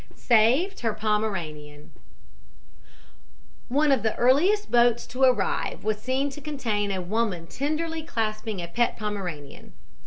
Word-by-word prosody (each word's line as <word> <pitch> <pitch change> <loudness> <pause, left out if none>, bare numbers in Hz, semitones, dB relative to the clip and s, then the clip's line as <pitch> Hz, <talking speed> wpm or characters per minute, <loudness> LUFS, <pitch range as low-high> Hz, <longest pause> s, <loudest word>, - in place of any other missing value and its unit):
SAVED 255 - +3
HER 225 -3 -1
POMERANIAN 170 -9 -3 1.8
"One 290 +3 +3
of 265 -5 +3
the 220 0 -1
earliest 335 - +3
boats 240 -1 +4
to 250 +3 -7
arrive 250 -7 +1
was 215 0 -1
seen 265 +3 -1
to 295 - -9
contain 230 -9 -2
a 190 -1 -2
woman 195 -3 -1
tenderly 310 - -3
clasping 215 - -3
a - - -5
pet 240 +7 0
Pomeranian. 185 -9 -6
225 Hz, 125 wpm, -25 LUFS, 205-270 Hz, 1.8 s, boats